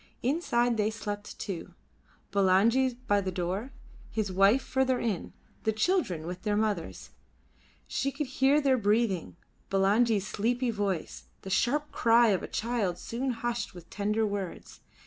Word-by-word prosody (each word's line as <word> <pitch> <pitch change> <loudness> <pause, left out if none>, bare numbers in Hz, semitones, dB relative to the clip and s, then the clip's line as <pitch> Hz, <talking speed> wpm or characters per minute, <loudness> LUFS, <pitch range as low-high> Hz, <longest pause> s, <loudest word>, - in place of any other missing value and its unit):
Inside 245 -4 +1
they 210 0 +2
slept 210 -2 -6
too: 180 -5 -6 0.6
Bulangi 225 +7 +3
by 205 -3 +3
the 190 -1 -3
door; 185 +8 -3 0.4
his 215 -3 -2
wives 195 +7 +4
further 260 -1 +1
in; 210 -7 -2 0.3
the 220 - +1
children 220 - 0
with 180 +1 -6
their 210 -1 0
mothers. 210 -6 -2 0.7
She 275 - -1
could 295 +2 -3
hear 265 +2 +3
their 270 -3 +3
breathing; 205 -5 +1 0.3
Bulangi's 200 +2 +3
sleepy 240 +4 0
voice; 200 -6 -3 0.2
the 190 - -6
sharp 290 +8 +1
cry 230 0 +4
of 195 -3 +2
a - - -5
child 215 -6 -1
soon 245 +8 -3
hushed 240 -3 -3
with 175 -1 -12
tender 210 +2 0
words. 200 -3 -5
220 Hz, 145 wpm, -29 LUFS, 195-245 Hz, 0.7 s, wives